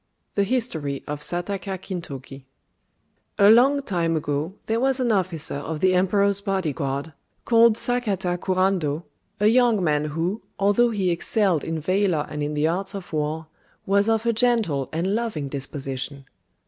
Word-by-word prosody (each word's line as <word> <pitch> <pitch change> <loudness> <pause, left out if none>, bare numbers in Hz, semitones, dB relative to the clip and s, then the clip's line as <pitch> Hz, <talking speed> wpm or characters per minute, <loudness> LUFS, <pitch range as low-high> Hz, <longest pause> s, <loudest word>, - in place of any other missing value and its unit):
(2)] - - -50
THE 200 - +2
HISTORY 160 - -1
OF 150 0 -5
SAKATA 190 +3 -3
KINTOKI 140 -8 -7 0.9
A 200 +1 +7
long 275 +5 +5
time 170 -7 0
ago 150 +4 -2
there 225 +1 0
was 265 +1 +3
an 245 -2 +1
officer 185 -6 -1
of 150 +2 -5
the 185 +2 +3
Emperor's 200 +2 +2
body 190 -7 -1
guard, 140 +3 -3 0.3
called 230 -1 +5
Sakata 205 -8 0
Kurando, 185 -5 0 0.4
a 210 - +2
young 230 -3 +4
man 150 -2 +1
who, 165 +8 -2 0.2
although 205 +5 +3
he 195 -5 0
excelled 180 -1 +1
in 165 0 -3
valour 185 -2 +1
and 150 - -4
in 150 +1 -2
the 150 +1 +2
arts 190 +4 -2
of 190 -4 -8
war, 155 +1 -2 0.4
was 200 +2 +2
of 225 0 +1
a 235 - +2
gentle 220 - +1
and 175 +5 -1
loving 210 -11 -2
disposition. 135 0 -5
185 Hz, 160 wpm, -24 LUFS, 150-210 Hz, 0.9 s, A